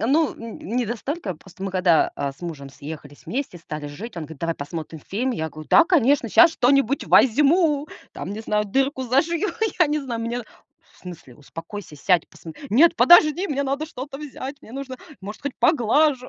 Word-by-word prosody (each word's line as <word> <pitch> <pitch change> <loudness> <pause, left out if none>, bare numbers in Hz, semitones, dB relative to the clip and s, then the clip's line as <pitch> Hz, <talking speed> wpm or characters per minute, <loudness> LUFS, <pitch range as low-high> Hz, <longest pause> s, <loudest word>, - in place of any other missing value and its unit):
ну, 290 +5 +2
н 230 -1 -9
не 240 +3 -2
настолько, 235 - -4
просто 185 +4 -14
мы 195 - -2
когда, 180 -3 +3
а, 140 -1 -2
с 135 - -25
мужем 155 -6 -7
съехались 145 0 -10
вместе 255 -8 -4
стали 155 -2 -7
жить, 190 +10 -9
он 165 - -4
говорит: 160 -1 -11
"Давай 165 0 -1
посмотрим 155 +2 -7
фильм." 240 - -2
Я 160 -10 -3
говорю: 155 0 -11
"Да, 335 - +7
конечно, 285 -8 +3
щас 340 - +7
что-нибудь 275 -1 +2
возьму 295 +4 +4 0.3
там, - - -6
не 215 - -6
знаю, 210 -1 0
дырку 265 +6 0
зашью, 315 - +1 0.3
я 350 - +5
не 300 +1 0
знаю." 240 -5 -4
Он 230 - -3
мне: 240 +1 -3 0.5
"В - - -24
смысле, 165 -9 -11
успокойся, 165 +3 -9
сядь, 175 +2 +2
посмот" 160 -2 -12
"Нет, 330 +9 +5
подожди, 345 +2 +6
мне 280 -1 -1
надо 280 +3 -2
что-то 275 -2 -8
взять. 280 -1 -7
Мне 220 - -14
нужно, 265 -1 -6 0.2
может 210 +5 -9
хоть, 285 -2 -4
поглажу." 275 -1 +2
235 Hz, 190 wpm, -23 LUFS, 175-285 Hz, 0.5 s, Да